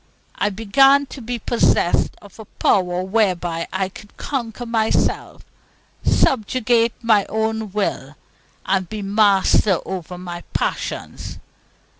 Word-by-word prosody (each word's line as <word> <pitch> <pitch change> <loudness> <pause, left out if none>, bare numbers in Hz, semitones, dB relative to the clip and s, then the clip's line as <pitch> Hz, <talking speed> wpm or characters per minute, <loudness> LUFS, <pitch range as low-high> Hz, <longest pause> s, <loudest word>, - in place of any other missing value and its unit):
I 205 - 0
began 270 +8 +4
to 265 - -10
be 245 +1 -4
possessed 225 -6 +1
of 205 +1 -16
a 220 - -9
power 180 -2 +1
whereby 180 -5 0
I 190 0 -1
could 205 +2 -14
conquer 245 -3 -4
myself, 225 -2 0 0.6
subjugate 235 -1 +2
my 215 -3 +3
own 220 -1 -2
will, 170 -8 -2 0.5
and 190 -2 0
be 215 -1 -5
master 200 -1 +3
over 180 -1 -6
my 175 -1 -7
passions. - - -3
210 Hz, 115 wpm, -20 LUFS, 190-230 Hz, 0.6 s, began